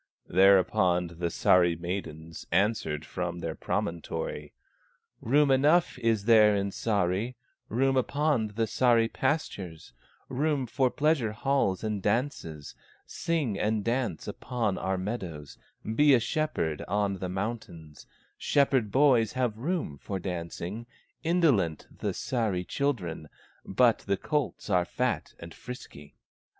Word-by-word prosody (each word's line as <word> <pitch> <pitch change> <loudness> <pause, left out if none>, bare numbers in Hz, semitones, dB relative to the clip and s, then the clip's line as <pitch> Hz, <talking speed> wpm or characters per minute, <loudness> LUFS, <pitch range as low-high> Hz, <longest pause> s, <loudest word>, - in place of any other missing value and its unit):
Thereupon 90 -1 +4
the 85 - 0
Sahri 85 0 +3
maidens 85 -3 -6
Answered 90 -5 +1
from 90 0 -4
their 85 -2 -4
promontory: 80 -3 -3 0.7
"Room 140 +3 +3
enough 150 +3 +3
is 115 -4 +1
there 110 -2 +6
in 100 0 -1
Sahri, 100 +3 -1 0.3
Room 135 +4 +2
upon 140 -2 +1
the 110 +2 -1
Sahri 115 0 +2
pastures, 100 - -3 0.3
Room 145 0 0
for 130 +2 +1
pleasure 145 -6 +1
halls 120 -5 0
and 105 -2 -2
dances; 105 - -2 0.3
Sing 145 -12 -2
and 105 0 0
dance 120 -7 -1
upon 115 -6 -2
our 95 0 -1
meadows, 90 -7 -5 0.3
Be 140 +6 +4
a - - +3
shepherd 120 - -1
on 100 0 0
the 90 - -3
mountains, 90 -6 -6 0.3
Shepherd 135 -7 +2
boys 130 -6 +4
have 125 -4 0
room 130 - -3
for 100 - -4
dancing; 90 +4 -5 0.4
Indolent 145 - +2
the - - -3
Sahri 105 -8 -1
children, 90 - -2 0.3
But 115 +4 +3
the 100 -1 -1
colts 150 +3 -2
are 90 -4 +3
fat - - -2
and 85 -1 -10
frisky." 100 - -10
105 Hz, 120 wpm, -28 LUFS, 90-130 Hz, 0.7 s, there